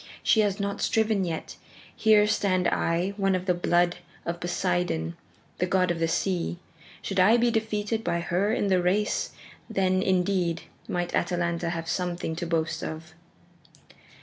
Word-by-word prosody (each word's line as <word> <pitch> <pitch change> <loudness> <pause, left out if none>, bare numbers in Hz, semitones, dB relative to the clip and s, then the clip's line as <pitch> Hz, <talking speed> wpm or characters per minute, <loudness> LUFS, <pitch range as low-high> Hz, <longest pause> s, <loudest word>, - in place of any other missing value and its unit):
She 220 - +4
has 205 -1 +2
not 200 0 -2
striven 220 -3 +2
yet. 165 -2 -5 0.4
Here 215 -2 +5
stand 185 -3 +1
I, 170 +3 +1
one 195 -2 +2
of 185 0 -3
the 180 - +3
blood 175 0 +2 0.3
of 170 0 -3
Poseidon, 175 - -1 0.4
the 180 - +1
god 180 -1 +2
of 170 - -2
the 165 - +2
sea. 175 0 -1 0.5
Should 195 -1 -2
I 210 +6 +6
be 240 0 +3
defeated 220 0 -1
by 170 -3 0
her 180 +5 0
in 220 - 0
the 190 -2 +3
race, 200 +4 +1 0.4
then, 185 -3 +1
indeed, 180 -2 +1 0.2
might 175 0 -2
Atalanta 170 -1 0
have 165 -1 -4
something 175 -3 -2
to 175 - -3
boast 165 -1 -1
of." 160 0 -6
180 Hz, 155 wpm, -27 LUFS, 170-200 Hz, 0.5 s, I